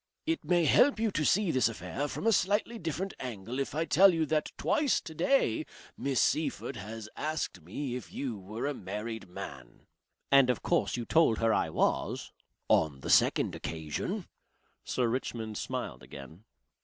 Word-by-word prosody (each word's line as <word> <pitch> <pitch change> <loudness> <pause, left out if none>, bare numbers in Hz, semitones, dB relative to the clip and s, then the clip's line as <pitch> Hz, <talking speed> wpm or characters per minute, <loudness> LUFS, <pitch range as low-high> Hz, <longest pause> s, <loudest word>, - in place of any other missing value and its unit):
"It 325 0 -1
may 175 -2 +3
help 265 - +5
you 225 -1 +1
to 155 - 0
see 190 +3 +3
this 130 -4 +3
affair 115 +7 -4
from 145 - -5
a 225 - +5
slightly 210 +4 +1
different 170 +4 -3
angle 120 0 -5
if 135 +1 -3
I 160 +2 +1
tell 185 +8 +6
you 165 -2 +1
that 155 0 0
twice 295 -4 +2
today 190 - +1 0.3
Miss 135 -3 -1
Seyffert - - 0
has 110 +2 -7
asked 155 - -3
me 120 - -4
if 125 - -7
you 130 -5 -3
were 105 +5 -6
a 145 - 0
married 110 -2 -6
man." - - -9 0.5
"And 135 -2 +6
of 125 - 0
course - - +1
you 120 - -3
told 160 -8 +4
her 115 -1 +2
I - - +1
was." - - 0 0.4
"On 75 -4 +2
the - - -2
second - - +4
occasion." 80 -2 -4 0.6
Sir 125 -2 0
Richmond 115 -3 -3
smiled - - -4
again. 75 - -11
130 Hz, 170 wpm, -30 LUFS, 110-165 Hz, 0.6 s, tell